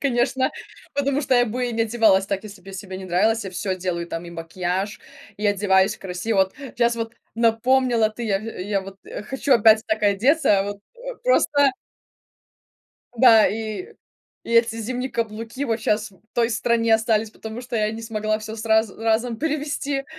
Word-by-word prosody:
конечно, 260 0 +1 0.4
потому 280 0 +1
что 270 -3 +1
я 245 0 +5
бы 245 +2 -2
не 225 0 +1
одевалась 220 -4 +3
так, 195 -1 -2
если 200 -2 -10
бы 195 - -14
я - - -11
себе 190 -1 -7
не 190 - -8
нравилась. 210 +5 +1
Я 190 - -5
всё 185 +1 -3
делаю 175 -2 -3
там: 165 0 -5
и 170 - -9
макияж, 180 +4 -3 0.4
и 210 0 -1
одеваюсь 195 0 +3
красиво. 195 +3 -3
Вот 190 0 +2
сейчас 240 -3 -1
вот 230 0 -4 0.2
напомнила 230 0 +2
ты, 235 +2 -6
я 195 -3 +1
в - - -11 0.2
я 200 +2 -1
вот 195 0 -10 0.3
хочу 270 +1 0
опять 220 -1 +6
так 215 0 -1
одеться, 210 +2 +3
вот, 205 0 -5 0.2
э, - - -7
просто 290 - +4 1.5
Да, 225 -2 +7
и 225 - -4 0.5
и 230 - -5
эти 230 -1 +4
зимние 250 +3 -3
каблуки 230 +4 -3
вот 230 -4 -1
сейчас 215 -1 0
в 190 - -23
той 235 -1 +2
стране 230 0 +1
остались, 220 -1 +1
потому 220 +2 -8
что 245 -1 -4
я 215 -1 +1
не 225 +1 -7
смогла 215 -1 -1
всё 220 +1 -7
сразу 220 -1 +1
разом 225 +1 +1
перевезти, 290 -2 -2
225 Hz, 180 wpm, -23 LUFS, 200-240 Hz, 1.5 s, Да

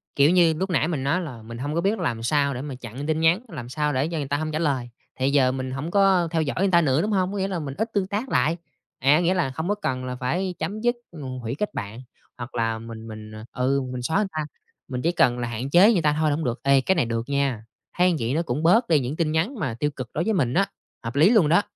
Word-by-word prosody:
Kiểu 145 +3 +5
như, 175 -3 +5
lúc 190 +5 -3
nãy 155 -3 +1
mình 155 -6 -2
nói 145 +7 +1
là 130 -10 -7
mình 115 +1 -9
hông 145 +5 -3
có 170 - +1
biết 205 +4 0
làm 115 -1 -2
sao 140 +3 +2
để 125 - -5
mà 145 -2 -6
chặn 125 +2 -7
tin 155 0 0
nhắn, 165 +5 +3
làm 125 - -8
sao 150 +1 -1
để 130 +3 +1
cho 165 0 -4
người 145 -3 -3
ta 145 +1 0
hông 155 +1 -3
trả 155 - -2
lời, 135 -7 -1 0.3
thì 130 +1 +2
giờ 135 -3 +4
mình 130 0 -4
hổng 140 +6 -4
có 195 -3 +4
theo 165 -2 +1
dõi 145 -3 -2
người 195 +1 +3
ta 170 - +5
nữa, 140 -1 +2
đúng 215 - -1
hông? 190 -2 +1
Có 205 - -4
nghĩa 190 0 0
là 185 -3 -3
mình 140 -4 -5
ít 220 +4 -1
tương 195 -2 0
tác 210 +7 -3
lại. 165 +3 +2 0.4
À, 140 +4 +4
nghĩa 175 +1 +2
là 175 -8 0
không 160 +5 -4
có 205 - +2
cần 130 -11 -3
là 125 0 -4
phải 175 +9 -2
chấm 200 +7 -3
dứt, 240 +1 +2 0.2
ngù 135 -6 -7
hủy 120 +1 -4
kết 210 +7 -3
bạn, 105 +4 -6 0.4
hoặc 120 0 -8
là 115 -1 0
mình 115 0 -9
mình, 110 -1 -9
ờ 110 0 -9 0.2
ừ, 135 +1 +2
mình 125 -1 -5
xóa 160 +9 0
người 210 - +2
ta, 155 -1 -3 0.4
mình 125 -1 -4
chỉ 170 - +2
cần 125 -8 +2
là 120 - -2
hạn 120 +4 -4
chế 190 +8 +6
người 180 - +2
ta 150 -1 +2
thôi 155 -1 +2
là 145 - +1
hổng 160 - -3
được. 120 +1 -2
Ê, 140 -1 +4
cái 190 +8 +1
này 160 - +2
được 115 +2 -3
nha! 140 -5 0 0.3
Thấy 180 -1 +4
vậy 115 +2 -1
nó 160 - +1
cũng 155 -2 -3
bớt 225 +9 +4
đi 160 -3 +4
những 130 +2 -3
tin 160 -2 0
nhắn 165 - 0
mà 130 -10 -1
tiêu 150 - +1
cực 130 -4 -7
đối 160 - 0
với 220 - 0
mình 135 - +1
á, 195 +2 +3 0.4
hợp 115 0 -5
lý 155 +7 +6
luôn 215 -10 +4
đó. 170 +5 +5
150 Hz, 300 wpm, -24 LUFS, 130-175 Hz, 0.4 s, chế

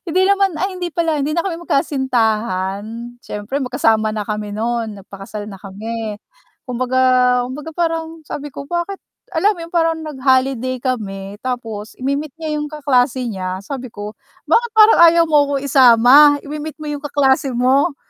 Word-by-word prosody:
hindi 360 +3 +1
naman, 395 0 +3
ay 380 0 -2
hindi 355 -1 -4
pala 330 0 0
hindi 295 - -1
na 335 +1 0
kami 365 - -2
magkasintahan 225 - 0 0.4
siyempre 210 +7 -4
magkasama 225 -4 +1
na 215 -1 -4
kami 210 -1 -4
no'n 225 0 -3
nagpakasal 195 +2 -9
na 200 -2 -9
kami, 215 +2 -6 0.5
Kumbaga, 255 +1 -1 0.5
kumbaga 290 +5 -7
parang 325 -1 -3
sabi 295 0 -6
ko, 280 +1 -8
"Bakit?" 345 +5 -3 0.4
Alam 415 +5 +3
mo - - -15
yun 335 - -9
parang 330 -1 +2
nag-holiday 260 -3 0
kami 200 -6 -3
tapos 225 -4 -5
imi-meet 280 +3 -2
niya 310 -2 -3
yung 295 - -3
kaklase 265 -4 +1
niya 185 -2 -4
sabi 260 +3 -6
ko, 210 0 -8 0.4
"Bakit 475 0 +3
parang 435 0 +7
ayaw 335 0 +5
mo 295 -2 +5
akong 275 - -1
isama? 270 +2 +7
Imi-meet 300 +1 -6
mo - - -6
yung 290 0 -5
kaklase 275 -2 +1
mo," 270 +6 +2
265 Hz, 160 wpm, -18 LUFS, 220-310 Hz, 0.5 s, parang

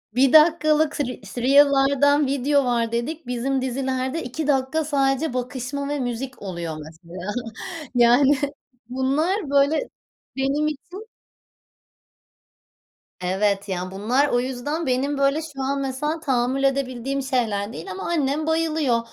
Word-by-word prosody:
1 260 +1 +4
dakikalık 310 -1 +4
re 250 -3 -3 0.2
reel'lardan 280 +1 +4
video 280 +1 +1
var 235 -2 0
dedik 260 +6 -3
bizim 255 +2 -1
dizilerde 260 +3 -2
2 275 +5 -4
dakika 275 +2 +1
sadece 275 0 +1
bakışma 255 +2 -4
ve 290 - -2
müzik 250 +1 -4
oluyor 170 -5 -5
mesela 170 +4 -8 0.6
yani, 250 +4 +5 0.5
bunlar 285 - 0
böyle 285 - +2 0.5
benim 275 +3 +1
için 355 +9 -8 2.1
Evet 195 +2 0
ya, 185 -1 -3
bunlar 235 +9 +1
o 245 - +2
yüzden 265 +6 -3
benim 270 +3 0
böyle 275 +2 +2
şu 290 -4 -7
an 275 +1 -1
mesela 285 +4 -2
tahammül 260 -1 0
edebildiğim 270 0 -1
şeyler 225 -6 -1
değil 385 - -8
ama 385 0 -6
annem 305 -2 0
bayılıyor, 320 -6 +1
270 Hz, 120 wpm, -23 LUFS, 245-290 Hz, 2.1 s, yani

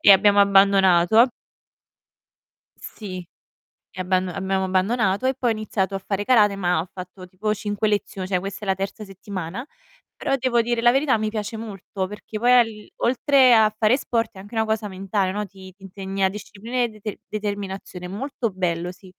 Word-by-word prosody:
e 200 - +8
abbiamo 200 +1 +5
abbandonato. 195 +2 +5 1.5
Sì, 185 -4 -8 0.8
abbam 185 0 +1
abbiamo 190 +1 -1
abbandonato 195 +3 +1
e 265 - +1
poi 250 -3 0
ho - - +2
iniziato 205 -2 -2
a - - -2
fare 200 0 -2
karate, 210 -5 +4
ma 180 -3 +1
ho 165 - -2
fatto 185 0 -10
tipo 210 +4 -2
5 205 0 -2
lezio 200 -2 -2
cioè 185 -1 0
questa 195 +2 -6
è - - -8
la 190 - +3
terza 195 +3 -5
settimana, 195 +2 -6 0.5
però 275 - 0
devo 240 -2 +2
dire 235 0 -1
la 240 0 +6
verità, 270 -2 +2
mi 215 0 -1
piace 215 +1 -4
molto, 195 -3 -5
perché 210 +1 -7
poi 245 +2 +3
al 240 -2 +6 0.3
oltre 260 +1 +4
a 215 -2 +5
fare 220 +3 +4
sport, 230 -4 -1
è 190 - -12
anche 205 +4 -11
una 220 0 +2
cosa 220 -1 -1
mentale, 190 0 -1
no, 210 +1 -3
ti 190 -1 -13
ti 195 - -22
insegna 195 0 -2
disciplina 210 +4 -7
e 240 - 0
dete 215 -1 -7
determinazione, 200 -3 -5
è - - -4
molto 245 +2 -3
bello, 180 -1 -2
sì. 185 0 -16
200 Hz, 180 wpm, -23 LUFS, 190-220 Hz, 1.5 s, e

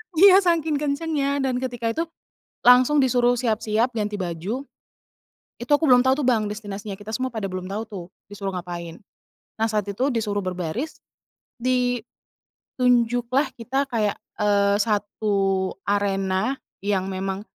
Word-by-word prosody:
Iya, 385 +3 +8
sangking 325 -3 +2
kencengnya, 285 -1 -1
dan 255 -1 0
ketika 245 -3 -3
itu 325 +7 -1 0.6
langsung 255 +4 +6
disuruh 245 -1 +3
siap-siap, 225 +1 +1
ganti 210 -1 -1
baju, 185 +9 -3 1.0
itu 240 +4 -7
aku 290 +2 +4
belum 250 -1 +7
tau, 260 0 +4
tuh, 290 - 0
Bang, 220 -4 +2
destinasinya 205 -1 -6
kita 205 +1 -8
semua 260 +2 -1
pada 220 -3 -5
belum 185 0 -5
tau, 215 +2 -2
tuh, 190 -5 -7 0.3
disuruh 200 -1 -4
ngapain. 170 -2 -6 0.6
Nah, 225 - +2
saat 210 -1 +1
itu 245 +7 -1
disuruh 210 -4 -1
berbaris, 185 - -4 1.6
ditunjuklah 245 +2 +1
kita 265 +4 -1
kayak, 215 -5 0 0.2
eee, 200 -1 +3
1 200 -2 0 0.2
arena 200 +4 0 0.3
yang 195 -2 +1
memang, 190 +1 -3
220 Hz, 135 wpm, -24 LUFS, 200-255 Hz, 1.6 s, Iya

